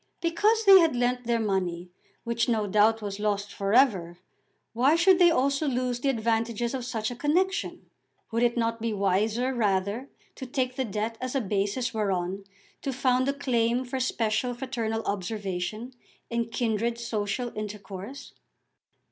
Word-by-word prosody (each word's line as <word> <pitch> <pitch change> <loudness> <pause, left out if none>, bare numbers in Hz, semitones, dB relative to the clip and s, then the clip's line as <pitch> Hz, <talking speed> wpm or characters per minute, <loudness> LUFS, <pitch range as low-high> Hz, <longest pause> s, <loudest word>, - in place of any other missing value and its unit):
Because 420 +7 +2
they 390 -1 +10
had 330 -6 +3
lent 245 0 0
their 235 -1 +2
money, 180 -4 -2 0.3
which 235 +1 0
no 220 -3 +1
doubt 215 +2 +3
was 200 0 -4
lost 205 -1 -1
for 200 0 -2
ever, 195 -9 +3 0.6
why 260 +7 +4
should 355 +2 +5
they 350 -1 +7
also 280 -1 +1
lose 250 -2 -1
the 275 - 0
advantages 230 0 0
of 255 -2 -3
such 225 -2 -2
a - - -5
connexion? 360 - -1 0.4
Would 230 +1 0
it 240 0 +2
not 230 -1 -1
be 230 -1 -1
wiser 210 +6 +1
rather 210 +2 0 0.3
to 260 - -6
take 255 0 -1
the 265 - -1
debt 220 +2 -3
as 255 +1 -4
a - - +3
basis 205 +3 -1
whereon 195 -2 -2 0.4
to 275 - -2
found 255 0 +1
a - - +1
claim 245 -3 0
for 260 +1 -3
special 240 -1 0
fraternal 230 -3 -3
observation 205 +3 -3 0.4
and 235 -1 -1
kindred 230 0 -1
social 230 +1 -3
intercourse? 210 +3 -7
235 Hz, 155 wpm, -27 LUFS, 210-255 Hz, 0.6 s, they